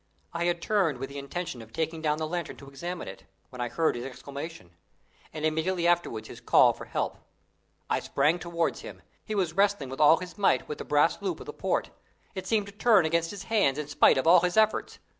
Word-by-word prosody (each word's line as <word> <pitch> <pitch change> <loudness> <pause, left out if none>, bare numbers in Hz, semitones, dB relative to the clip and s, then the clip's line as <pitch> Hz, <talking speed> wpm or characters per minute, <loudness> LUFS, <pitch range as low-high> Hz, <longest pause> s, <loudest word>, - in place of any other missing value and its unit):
I 170 0 -1
had 175 -1 0
turned 190 -10 +1
with 135 +2 -5
the 140 - -6
intention 140 -2 -5
of 110 0 -13
taking 160 +4 -3
down 150 -1 +1
the 160 - -2
lantern 175 0 -4
to 140 - -13
examine 170 +6 -6
it, 95 - -10 0.3
when 125 -1 -7
I 120 - -2
heard 165 0 +1
his 120 - -5
exclamation, 140 - -8 0.6
and 155 0 -4
immediately 165 +3 0
afterwards 170 -11 +1
his - - -11
call - - +5
for - - -10
help. - - -3 0.7
I - - +1
sprang 150 +5 +1
towards 170 -1 -2
him. - - -10 0.2
He 215 - -4
was 180 -5 0
wrestling 200 -7 +1
with 135 - -4
all 155 +2 +7
his 180 +3 -9
might 190 -10 +2
with 150 - -6
the - - -6
brass 150 +5 +2
loop 200 - -3
of - - -9
the - - -7
port. - - -1 0.4
It 190 -2 -6
seemed 215 -1 +1
to 200 - -10
turn 205 -3 +4
against 165 +1 +1
his 200 -2 -7
hands 200 -12 +2
in 150 -1 -4
spite 145 - +4
of 130 - 0
all 170 +2 +7
his 180 +3 -1
efforts. 220 0 +2
165 Hz, 225 wpm, -28 LUFS, 140-180 Hz, 0.7 s, all